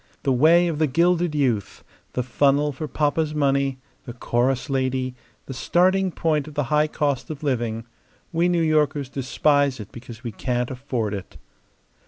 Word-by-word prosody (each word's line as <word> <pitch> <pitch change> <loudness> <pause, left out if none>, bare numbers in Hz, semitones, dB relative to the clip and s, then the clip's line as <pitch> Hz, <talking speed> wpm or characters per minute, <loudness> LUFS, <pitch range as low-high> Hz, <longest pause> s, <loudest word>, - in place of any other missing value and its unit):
The 135 - +2
way 165 +7 +5
of 160 -3 -2
the 155 - +3
gilded 170 +3 +2
youth; 125 -9 -1 0.3
the 125 - -1
funnel 140 +3 +2
for 150 +3 -5
papa's 150 +1 0
money; 140 -2 +1 0.3
the 120 - -7
chorus 125 +2 0
lady; 130 -2 -1 0.3
the 135 - -6
starting 185 +8 +2
point 155 -3 0
of 150 - -10
the 145 - +1
high 150 +1 +4
cost 145 -1 -1
of 155 -1 -7
living. 120 -5 -1 0.5
We 170 +2 +2
New 175 -2 +2
Yorkers 150 -3 +1
despise 140 0 +1
it 105 -1 -9
because 120 0 -11
we 120 - -4
can't 125 +2 -2
afford 125 -5 -3
it." 100 -2 -7
140 Hz, 165 wpm, -23 LUFS, 125-155 Hz, 0.5 s, way